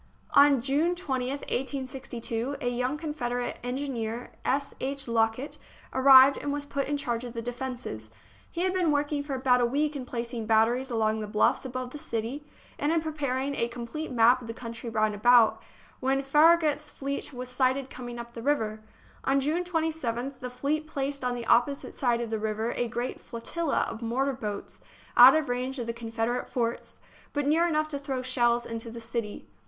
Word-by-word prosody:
On 280 -3 +6
June 300 +6 +1
20th, 270 -5 -2
1862, 260 -2 -3
a 250 - -3
young 250 +4 -1
Confederate 245 -6 -3
en 245 +1 -2
gineer, 240 -4 -4
S. 275 +2 0
H. 275 0 -3
Lockett, 230 +4 0 0.3
arrived, 265 +1 +8
and 285 - -3
was 290 0 -3
put 280 -1 -2
in 290 +1 0
charge 240 -4 -2
of 240 -2 -7
the 230 - -4
defences. 245 - -5 0.4
He 340 - -4
had 370 0 +1
been 360 -3 +2
working 290 0 0
for 285 -1 -4
about 255 -1 +3
a - - +4
week 295 +4 0
in 260 -3 -5
placing 235 -2 -4
batteries 230 +4 +3
along 220 -2 +1
the 215 - -4
bluffs 210 +5 +2
above 255 0 -4
the 295 - -8
city, 235 +4 -4 0.4
and 290 +2 +1
in 330 - +3
preparing 285 -4 -2
a 235 - 0
complete 245 +6 -6
map 245 +1 +5
of 235 - -9
the 230 - -6
country 230 0 -7
round 215 -1 +1
about, 235 +2 +5 0.4
when 270 +1 +1
Farragut's 300 +1 +4
fleet 280 +1 -4
was 250 -1 -6
sighted 260 +1 0
coming 240 -1 -7
up 235 0 -8
the 230 - -7
river. 220 -6 0 0.4
On 275 +1 +2
June 310 +6 0
27th 310 -7 -2
the 250 -1 -5
fleet 285 +5 -2
placed 280 -2 -2
on 250 0 0
the 240 -1 -5
opposite 245 +5 +2
side 240 -3 +1
of 230 -1 -4
the 220 - -1
river 220 +2 -1
a 245 - -1
great 240 +2 -4
flotilla 280 +7 -2
of 225 - -7
mortar 260 +4 0
boats, 210 -5 -6 0.4
out 255 +3 +10
of 315 -2 +1
range 255 +2 -2
of 240 - -3
the 230 - -3
Confederate 230 +1 -2
forts, 235 -2 -3 0.3
but 290 -1 0
near 325 +4 +3
enough 310 -2 +1
to 285 -2 -3
throw 270 -3 -3
shells 240 -2 +2
into 230 0 -5
the 230 +1 -8
city. 230 -2 -5
255 Hz, 190 wpm, -28 LUFS, 235-285 Hz, 0.4 s, out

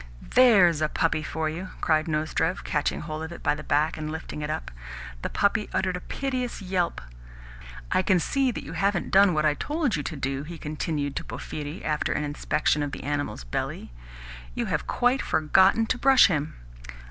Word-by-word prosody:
"THERE'S 195 -11 +6
a 155 - +2
puppy 160 0 0
for 155 +1 -2
you!" 175 +4 -5
cried 155 -1 +2
Nozdrev, 155 - -1
catching - - -1
hold 155 0 -5
of 160 +1 -5
it 170 - -9
by 145 - +3
the 150 - -6
back, 150 +2 +1
and 155 0 -4
lifting 160 -1 -6
it 150 - -3
up. 155 +1 -4 0.5
The - - -3
puppy 210 +1 +1
uttered 185 -1 0
a - - -3
piteous 255 +3 -3
yelp. 180 - -1 0.9
"I - - +3
can 185 -1 +3
see 270 - +1
that 240 - -4
you - - -8
haven't 195 -2 0
done 195 -3 +5
what 155 0 +2
I 150 - +4
told 295 - -1
you 150 - -2
to 150 - -5
do," 135 -1 -2
he 165 +3 -8
continued 150 -2 -3
to - - -3
Porphyri 150 +3 -6
after 150 -1 0
an - - -1
inspection 150 0 0
of 145 -1 -3
the - - -6
animal's 145 - -3
belly. - - -4 0.6
"You - - -1
have - - -2
quite 245 +2 +2
forgotten 190 +8 +3
to 245 - -1
brush 270 0 +7
him." 155 -5 0
160 Hz, 195 wpm, -26 LUFS, 150-195 Hz, 0.9 s, brush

